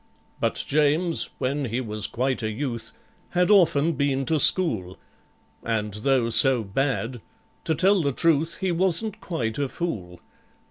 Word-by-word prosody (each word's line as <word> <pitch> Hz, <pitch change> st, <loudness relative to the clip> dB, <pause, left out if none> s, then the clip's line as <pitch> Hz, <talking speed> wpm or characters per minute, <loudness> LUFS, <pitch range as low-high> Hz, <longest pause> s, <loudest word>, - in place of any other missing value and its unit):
But -, -, -1 dB
JAMES, 155 Hz, +4 st, +1 dB
when 140 Hz, +2 st, -2 dB
he 120 Hz, +1 st, -3 dB
was 110 Hz, -3 st, -2 dB
quite 130 Hz, +1 st, -2 dB
a 110 Hz, -, -2 dB
youth, 120 Hz, +1 st, -5 dB, 0.5 s
Had 180 Hz, +3 st, +3 dB
often 165 Hz, -5 st, +3 dB
been 135 Hz, -1 st, -1 dB
to 155 Hz, +3 st, 0 dB
school, 110 Hz, -, +5 dB, 0.6 s
And 105 Hz, -3 st, -3 dB
though 115 Hz, +2 st, 0 dB
so 120 Hz, +1 st, +3 dB
bad, 120 Hz, +2 st, -2 dB, 0.4 s
to 160 Hz, -, 0 dB
tell 190 Hz, +3 st, +3 dB
the 140 Hz, -3 st, 0 dB
truth, 160 Hz, +3 st, 0 dB
He 190 Hz, -1 st, 0 dB
wasn't 190 Hz, +5 st, -1 dB
quite 120 Hz, -9 st, -4 dB
a 140 Hz, -2 st, -1 dB
fool. 95 Hz, -, -5 dB
135 Hz, 145 wpm, -24 LUFS, 115-165 Hz, 0.6 s, school